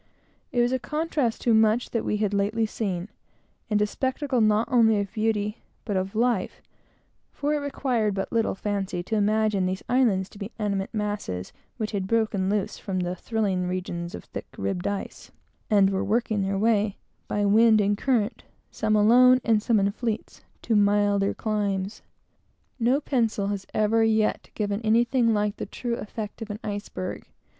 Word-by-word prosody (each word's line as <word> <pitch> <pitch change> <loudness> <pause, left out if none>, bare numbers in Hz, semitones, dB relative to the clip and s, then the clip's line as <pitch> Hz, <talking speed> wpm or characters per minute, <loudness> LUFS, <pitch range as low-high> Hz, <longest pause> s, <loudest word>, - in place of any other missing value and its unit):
It 245 - +2
was 240 +1 +2
a 260 - 0
contrast 300 -5 -1
to 235 - +3
much 220 +2 +3
that 230 - -1
we 210 - 0
had 210 -1 0
lately 205 +3 +1
seen, 195 -4 -3 0.6
and 210 -1 +2
a - - +3
spectacle 260 +3 -1
not 215 +1 +3
only 225 -4 +4
of 200 -1 -4
beauty, 215 -1 -1 0.3
but 205 - -2
of 190 +2 -2
life; 230 -4 0 0.7
for 290 +1 -1
it 300 - +1
required 250 -7 -1
but 195 - -3
little 225 -4 +1
fancy 195 -3 -2
to 220 - -2
imagine 210 -2 +2
these 185 +1 -3
islands 230 -7 +2
to 200 - -14
be 205 +2 -6
animate 200 -3 -2
masses 205 - -3 0.2
which 215 -3 -3
had 195 -2 -2
broken 215 -4 +1
loose 210 0 -1
from 185 -2 -3
the 180 0 -2
"thrilling 195 -3 -1
regions 175 -1 -4
of 85 - -9
thick - - -8
ribbed 100 - -2
ice," 200 -1 -5 0.4
and 200 -3 +4
were 190 - 0
working 220 -1 0
their 195 0 -1
way, 210 -1 +2 0.3
by 205 0 0
wind 220 +2 +5
and 205 0 +2
current, 245 -4 0 0.3
some 215 0 0
alone, 250 +4 +6
and 220 -2 +3
some 225 -1 +2
in 200 0 +2
fleets, 225 0 -4 0.2
to 225 - +1
milder 205 -1 +3
climes. 205 -2 -2 0.8
No 250 +5 +2
pencil 225 -8 0
has 200 -2 -4
ever 220 +1 +2
yet 220 -1 +1
given 205 0 -1
anything 235 +2 +3
like 210 -1 0
the - - -5
true 235 +3 -3
effect 215 +1 -6
of 225 - -6
an 205 - -4
iceberg. 205 - -5
210 Hz, 170 wpm, -26 LUFS, 200-230 Hz, 0.8 s, alone